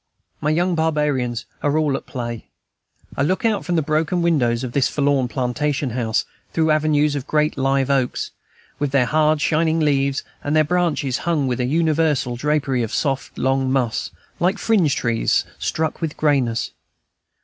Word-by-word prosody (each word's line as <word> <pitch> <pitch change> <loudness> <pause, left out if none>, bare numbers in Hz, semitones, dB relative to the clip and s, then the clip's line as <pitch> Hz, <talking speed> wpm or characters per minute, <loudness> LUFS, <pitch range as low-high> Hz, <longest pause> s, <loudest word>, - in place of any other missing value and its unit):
My 150 - 0
young 175 +4 +1
barbarians 150 -7 0 0.2
are 145 +1 +1
all 150 -3 +1
at - - -6
play. 120 -3 -5 0.7
I - - -1
look 185 - 0
out 215 -3 +1
from 175 - -1
the 160 - +2
broken 155 +4 0
windows 125 -8 +1
of 125 - -4
this 135 +1 +2
forlorn 140 -3 +1
plantation 135 +2 -1
house, 115 -2 0 0.3
through 160 -1 +2
avenues 150 -1 +2
of 140 -1 -4
great 150 0 +1
live 135 0 +1
oaks, 130 -3 0 0.5
with 145 -1 0
their 135 -2 +3
hard, 155 +2 +2
shining 160 +1 +2
leaves, 140 -2 +1 0.2
and 145 +2 0
their 155 - +5
branches 155 -6 0
hung 160 -4 0
with 125 -2 -1
a 125 - +1
universal 155 -3 +1
drapery 135 -1 0
of 115 - -3
soft, 135 -3 -2
long 135 0 +1
moss, 125 -4 0 0.3
like 185 +4 +2
fringe 190 -12 +2
trees 115 -2 +1
struck 160 +1 -2
with 160 -2 -3
grayness. 135 -7 +1
145 Hz, 165 wpm, -21 LUFS, 130-155 Hz, 0.7 s, their